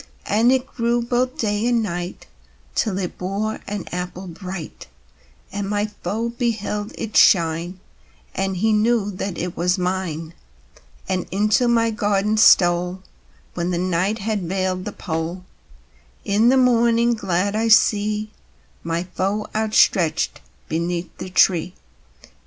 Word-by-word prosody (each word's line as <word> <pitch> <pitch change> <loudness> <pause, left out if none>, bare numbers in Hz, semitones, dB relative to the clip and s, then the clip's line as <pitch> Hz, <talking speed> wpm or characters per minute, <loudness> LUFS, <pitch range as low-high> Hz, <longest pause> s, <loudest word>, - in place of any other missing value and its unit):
And 225 +4 +3
it 260 -1 +2
grew 235 -1 -1
both 250 +1 -1
day 210 +1 0
and 235 -2 +2
night, 175 -2 -5 0.5
Till 200 -4 0
it 185 -3 -4
bore 200 +4 -2
an 205 -3 -4
apple 180 +1 -5
bright, 180 -1 -8 0.6
And 200 0 -3
my 205 0 0 0.2
foe 230 +3 -2
beheld 220 -3 -2
it 220 -1 -5
shine, 170 +1 +3 0.5
and 195 -1 -2
he 220 +4 +2
knew 215 -1 +2
that 185 -1 -5
it 175 0 -4
was 180 +2 +1
mine, 180 -3 -3 0.7
And 185 -1 -2
into 215 +6 +2
my 230 -1 +3
garden 210 0 0
stole 180 -2 +4 0.5
When 175 0 -2
the 175 - -1
night 185 +4 0
had 215 -1 -2
veiled 185 +1 -2
the 210 - -4
pole; 170 0 -4 0.8
In 215 +4 +3
the 265 - +4
morning, 235 -1 +3
glad, 200 -1 -1
I 225 +1 +1
see 215 -1 +3 0.5
My 170 +1 -2
foe 195 +3 -2
outstretched 205 -7 +2 0.3
beneath 170 +2 -3
the - - -6
tree. 180 -1 +3
200 Hz, 135 wpm, -21 LUFS, 180-220 Hz, 0.8 s, stole